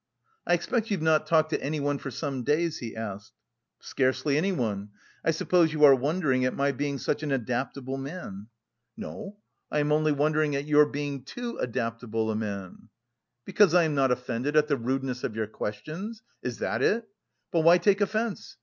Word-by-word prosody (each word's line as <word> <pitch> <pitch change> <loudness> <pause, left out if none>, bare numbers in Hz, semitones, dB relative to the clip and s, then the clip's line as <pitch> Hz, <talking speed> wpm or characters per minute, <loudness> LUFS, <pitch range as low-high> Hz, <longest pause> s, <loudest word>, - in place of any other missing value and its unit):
"I 175 - +5
expect 225 +6 -1
you've 195 -7 -1
not 160 -1 +3
talked 155 -1 +3
to - - 0
anyone 145 -1 -1
for 135 - -5
some 135 +1 -3
days?" 155 +5 0
he 115 -2 -6
asked. 105 -3 -6 0.5
"Scarcely 135 +2 0
anyone. 120 - -1 0.3
I - - +1
suppose 165 +1 +3
you 150 -1 +1
are 140 -2 +10
wondering 135 -1 +1
at 130 - 0
my 140 0 +2
being 140 +1 -2
such 145 - -1
an 150 -2 -3
adaptable 130 +2 -2
man?" 135 - -7 0.5
"No, 205 -2 -7 0.3
I - - -1
am 150 0 +1
only 155 0 +3
wondering 150 0 +1
at 140 +1 -2
your 150 0 +5
being 145 -2 -4
too 240 - -6
adaptable 115 -2 -2
a - - -2
man." 100 -1 -5 0.6
"Because 200 -5 +4
I 175 - +6
am 155 -2 0
not 135 -2 +3
offended 125 +3 -1
at 150 0 +5
the 145 - +2
rudeness 130 0 -2
of 110 - -3
your 110 -1 -1
questions? 155 - -6 0.2
Is 125 -2 -4
that 115 - -2
it? 225 +10 +2 0.5
But 170 - +2
why 170 +2 +7
take 200 +2 +2
offence? 215 +2 -2
145 Hz, 180 wpm, -27 LUFS, 125-160 Hz, 0.6 s, are